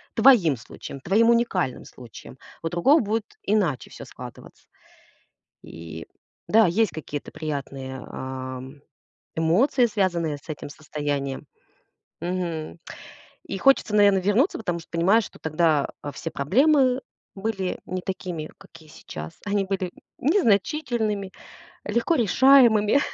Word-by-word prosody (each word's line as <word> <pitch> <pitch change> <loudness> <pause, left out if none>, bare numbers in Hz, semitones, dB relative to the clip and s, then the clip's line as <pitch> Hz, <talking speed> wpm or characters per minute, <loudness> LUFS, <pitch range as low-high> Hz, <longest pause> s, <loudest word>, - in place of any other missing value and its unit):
твоим 220 - +6
случаем, 135 +3 -10
твоим 215 - +3
уникальным 230 - +1
случаем. 125 +1 -12 0.3
У 165 - -1
другого 220 - +4
будет 220 -2 -1 0.2
иначе 185 - 0
всё - - -10
складываться. - - -12 1.0
И 80 0 -9 0.4
да, 220 -1 +6
есть 210 +6 +2
какие-то 150 -2 -6
приятные, 135 -3 -5
ам, 130 +1 -7 0.6
эмоции, 195 - +3
связанные 175 -8 0
с 140 - -22
этим 150 -4 -6
состоянием. 145 -2 -4 0.8
Мгм. 170 - -3 0.7
И - - -4
хочется, 270 -4 +3
наверно, 205 -2 +6
вернуться, 205 - +2
потому 175 -6 -3
что 165 - -15
понимаешь, 190 +6 +3
что - - -13
тогда, 155 -2 +1
а, 145 - -5
все 165 +4 -6
проблемы 260 - +3 0.3
были 195 -2 -3
не 185 0 -4
такими, 180 -4 -5
какие 155 -1 -16
сейчас. 80 - -9
Они 200 -1 0
были 190 -2 -2 0.3
незначительными, 225 - +1 0.5
легко 235 +10 +1
решаемыми. 240 0 +5
185 Hz, 115 wpm, -24 LUFS, 150-225 Hz, 1.0 s, твоим